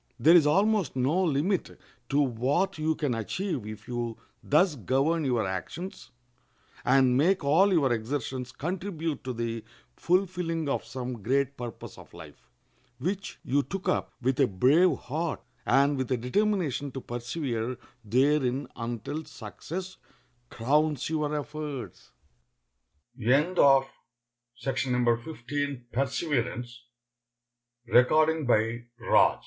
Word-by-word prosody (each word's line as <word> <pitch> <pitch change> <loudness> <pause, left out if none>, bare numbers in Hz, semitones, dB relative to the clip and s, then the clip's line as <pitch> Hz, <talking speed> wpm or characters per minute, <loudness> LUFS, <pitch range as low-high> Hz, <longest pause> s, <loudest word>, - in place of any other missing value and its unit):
There 165 +3 +7
is 160 -4 +6
almost 195 +1 +2
no 140 +9 +2
limit 170 +4 0 0.3
to 140 - +2
what 145 +9 +1
you 155 +1 +1
can 145 -5 -1
achieve 125 - -3
if 110 -1 -9
you 120 -2 -3 0.2
thus 155 +2 +3
govern 140 - +1
your 120 -5 +1
actions, 170 - -6 0.7
and 130 -1 +4
make 175 +7 +3
all 165 +8 +4
your 140 -9 +3
exertions 125 +2 -3
contribute 165 +1 -4
to 130 - -3
the 115 -1 -3 0.3
fulfilling 175 -3 0
of 140 - -1
some 125 -3 -5
great 135 +5 +1
purpose 120 -4 -8
of - - -15
life, - - -13 0.5
which 190 +7 -3
you 140 +3 +2
took 185 +8 -6
up - - 0
with 130 +2 +1
a 135 - +5
brave 140 - +4
heart, 155 +4 -3 0.3
and 140 +2 +4
with 130 0 -2
a 130 - +2
determination 145 - 0
to 135 - -4
persevere 120 -1 -3 0.3
therein 130 +3 +2
until 120 +6 -4
success 170 - -7 0.8
crowns 155 -1 -1
your 150 -1 0
efforts. 145 - -6 1.1
[Ill 140 +10 +2
140 Hz, 105 wpm, -28 LUFS, 125-165 Hz, 1.1 s, There